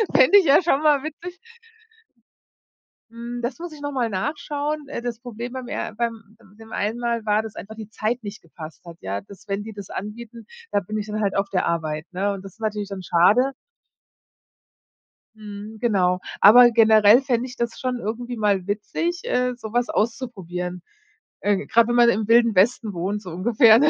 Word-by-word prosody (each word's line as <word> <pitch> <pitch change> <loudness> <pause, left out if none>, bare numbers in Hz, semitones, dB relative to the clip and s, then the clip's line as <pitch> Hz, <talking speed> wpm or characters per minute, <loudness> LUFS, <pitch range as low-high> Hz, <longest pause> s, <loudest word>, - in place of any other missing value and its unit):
Fände 260 +11 +7
ich 380 - 0
ja 285 +3 +6
schon 310 -5 +1
mal 295 -3 +3
witzig. 345 +4 -7 1.7
Hm, 235 +1 -7
das 240 +4 -4
muss 345 -1 -7
ich 295 - -12
noch 290 0 -3
mal 250 -4 -1
nachschauen. 290 +7 -3
Äh, 275 - -5
das 235 -2 -4
Problem 240 0 -7
beim 255 -1 -6
er 225 - -4
beim 225 -2 -4 0.2
dem 225 0 -14
einen 215 +2 -2
Mal 235 -2 -2
war, 210 0 +2
dass 220 -1 -9
einfach 220 +3 -8
die 220 -1 -9
Zeit 225 +3 -2
nicht 205 +1 -8
gepasst 160 0 -12
hat, 170 -1 -11
ja. 95 +1 -3
Dass, 195 - -16
wenn 200 +1 -2
die 220 +1 -8
das 200 -2 -9
anbieten, 230 +3 -8 0.3
da - - +2
bin 215 +3 -5
ich 210 0 -4
dann 215 0 -3
halt 200 -2 0
auf 195 0 0
der 185 -2 0
Arbeit, 160 -2 -2
ne? 195 +3 0
Und 195 -1 -8
das 195 +1 -12
natürlich 210 -2 -3
dann 195 -2 -6
schade. 205 +11 +4 1.8
Mhm, 210 0 -9
genau. 185 -6 +2 0.2
Aber 240 +4 +9
generell 220 0 +6
fände 255 -2 -1
ich 250 - -10
das 235 -1 -3
schon 255 -1 -2
irgendwie 240 +3 -4
mal 200 -3 +1
witzig, 330 +12 -2
äh, 250 - 0
sowas 240 +1 -2
auszuprobieren. 180 -7 -3 0.6
Äh, 205 0 0
grad 230 0 +4
wenn 240 - 0
man 240 -1 +6
im 220 -2 0
Wilden 230 -1 +4
Westen 215 +2 +2
wohnt, 190 +4 -3
so 190 - -9
ungefähr, 220 +5 +5
ne? 295 +3 +4
220 Hz, 190 wpm, -23 LUFS, 200-245 Hz, 1.8 s, Aber